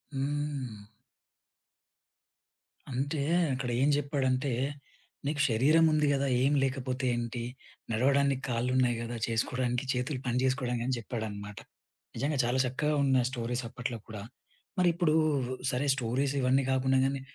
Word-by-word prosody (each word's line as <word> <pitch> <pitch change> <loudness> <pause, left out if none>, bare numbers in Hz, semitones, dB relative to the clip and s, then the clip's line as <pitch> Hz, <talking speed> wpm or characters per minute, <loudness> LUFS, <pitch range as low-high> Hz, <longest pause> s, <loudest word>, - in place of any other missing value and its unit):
హ్మ్. 135 -6 -3 2.0
అంటే 140 +4 -1 0.3
అక్కడేం 130 0 0
జెప్పాడంటే 140 -2 0 0.8
నీకు 150 0 0
శరీరం 145 +9 +4
ఉంది 150 -1 +3
గదా! 140 0 +1
ఏం 135 +3 +3
లేకపోతే 130 -1 -2
ఏంటి? 120 0 -3 0.5
నడవడానికి 135 +3 +2
కాళ్ళున్నాయి 125 +1 +1
గదా! 120 +1 -4
చేసుకోవడానికి 125 +2 -1
చేతులు 125 +2 -2
పని 120 0 0
చేసుకోవడానికి 125 -2 0
అని 130 0 0
జెప్పాడన్నమాట. 105 -3 -5 0.6
నిజంగా 145 +1 -1
చాలా 120 +2 +1
చక్కగా 150 +4 0
ఉన్నాయి 130 -3 +3
స్టోరీస్ 120 0 -3
అప్పట్లో 120 0 -4
కూడా. 105 -2 -7 0.6
మరిప్పుడు 175 -3 +3 0.6
సరే 130 +3 -1
స్టోరీస్ 130 +2 -1
ఇవన్నీ 130 +1 +3
గాకుండా 130 0 +2
గానీ 135 0 0
130 Hz, 115 wpm, -30 LUFS, 120-140 Hz, 2.0 s, శరీరం